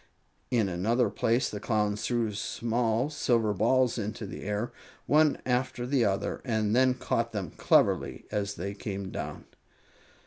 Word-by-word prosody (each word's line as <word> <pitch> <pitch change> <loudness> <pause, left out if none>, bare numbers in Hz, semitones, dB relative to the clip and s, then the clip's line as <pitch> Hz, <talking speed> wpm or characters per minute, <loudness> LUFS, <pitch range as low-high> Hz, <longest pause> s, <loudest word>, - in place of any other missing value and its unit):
In 115 -5 +2
another 105 +6 +1
place 115 +4 +1
the 105 - -5
Clowns 105 -1 0
threw 115 -3 0
small 115 +5 0
silver 115 -7 +1
balls 120 +4 +2
into 105 +1 -4
the 95 - -7
air, 105 +3 -2 0.3
one 150 0 +4
after 125 0 0
the 125 -2 +2
other, 100 -1 -1
and 110 -3 0
then 130 0 +4
caught 115 -2 -1
them 95 -7 -3
cleverly - - +2
as 100 -1 -2
they 100 +4 -4
came 100 -2 -5
down. - - -6
115 Hz, 145 wpm, -29 LUFS, 105-125 Hz, 0.3 s, one